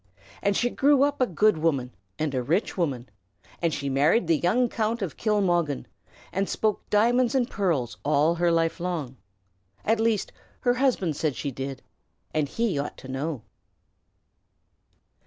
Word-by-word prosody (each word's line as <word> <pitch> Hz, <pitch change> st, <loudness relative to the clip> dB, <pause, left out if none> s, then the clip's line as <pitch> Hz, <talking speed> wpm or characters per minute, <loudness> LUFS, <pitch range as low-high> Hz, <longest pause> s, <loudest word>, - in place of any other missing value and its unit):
And 200 Hz, -1 st, +1 dB
she 245 Hz, 0 st, +1 dB
grew 280 Hz, 0 st, +4 dB
up 285 Hz, -1 st, 0 dB
a 255 Hz, -, +4 dB
good 190 Hz, 0 st, +2 dB
woman 140 Hz, -6 st, 0 dB, 0.2 s
and 155 Hz, -2 st, -1 dB
a 130 Hz, -, 0 dB
rich 165 Hz, -, 0 dB
woman; 135 Hz, -9 st, -1 dB, 0.5 s
and 170 Hz, -1 st, +2 dB
she 140 Hz, -2 st, -3 dB
married 145 Hz, -, +3 dB
the 165 Hz, -2 st, +2 dB
young 235 Hz, +8 st, +2 dB
Count 225 Hz, -1 st, -1 dB
of 175 Hz, -, -4 dB
Kilmoggan, 175 Hz, -, +1 dB, 0.5 s
and 195 Hz, +1 st, -1 dB
spoke 215 Hz, -2 st, -1 dB
diamonds 240 Hz, +4 st, +3 dB
and 250 Hz, -3 st, +2 dB
pearls 150 Hz, -, -1 dB
all 150 Hz, +3 st, +3 dB
her 170 Hz, 0 st, +2 dB
life 165 Hz, +1 st, +1 dB
long, 160 Hz, -8 st, -3 dB, 0.7 s
at 225 Hz, +1 st, +2 dB
least 225 Hz, -2 st, +1 dB, 0.3 s
her 245 Hz, -, +3 dB
husband 245 Hz, -, +1 dB
said 150 Hz, -2 st, -1 dB
she 140 Hz, -, -3 dB
did, 135 Hz, +1 st, -6 dB, 0.5 s
and 150 Hz, -3 st, 0 dB
he 225 Hz, -8 st, 0 dB
ought 140 Hz, -, -4 dB
to -, -, -11 dB
know. 135 Hz, -1 st, -3 dB
170 Hz, 155 wpm, -26 LUFS, 145-220 Hz, 0.7 s, grew